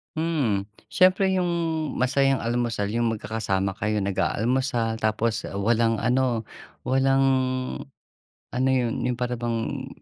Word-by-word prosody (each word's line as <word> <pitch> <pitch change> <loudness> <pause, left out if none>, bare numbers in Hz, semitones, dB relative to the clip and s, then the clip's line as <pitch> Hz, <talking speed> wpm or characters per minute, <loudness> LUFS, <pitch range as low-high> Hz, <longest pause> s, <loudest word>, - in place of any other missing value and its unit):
Mm. 140 -12 0 0.2
Siyempre 185 +1 +4
yung 180 -2 +1 0.5
masayang 135 +1 +2
almusal 120 -3 -1
yung 120 0 +1
magkakasama 100 -3 -2
kayo 105 +2 -1
nag-aalmusal, 110 - 0
tapos 110 +1 0
walang 115 +3 +1
ano, 125 -1 +1 0.4
walang, 135 +1 +3 1.3
ano 130 +2 0
yun, 125 -3 +1
yung 125 - 0
para 125 0 -3
bang 120 +3 -3
120 Hz, 110 wpm, -25 LUFS, 110-130 Hz, 1.3 s, Siyempre